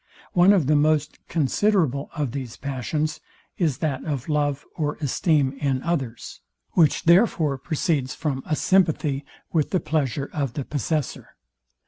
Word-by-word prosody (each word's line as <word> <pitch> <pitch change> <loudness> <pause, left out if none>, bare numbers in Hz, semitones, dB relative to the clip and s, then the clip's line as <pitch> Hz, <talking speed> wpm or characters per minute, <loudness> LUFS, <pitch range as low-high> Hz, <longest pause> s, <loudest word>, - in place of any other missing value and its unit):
One 180 +2 +6
of 190 -8 +3
the 150 +3 +3
most 150 0 +2
considerable 160 - +1
of 145 -5 -1
these 130 -3 -6
passions 145 +3 -2 0.4
is 155 -8 +1
that 135 -4 -2
of 140 -6 -3
love 145 -2 0
or 150 -2 -1
esteem 145 -1 +1
in 135 -3 0
others, 135 - -3 0.3
which 160 -4 +3
therefore 170 - +3
proceeds 150 -4 -1
from 145 -5 -2
a 155 - +1
sympathy 155 -6 +2 0.3
with 155 -4 +2
the 185 - +1
pleasure 140 -3 -1
of 140 -6 -2
the 140 -1 -4
possessor. 150 +1 -3
150 Hz, 140 wpm, -24 LUFS, 135-160 Hz, 0.4 s, One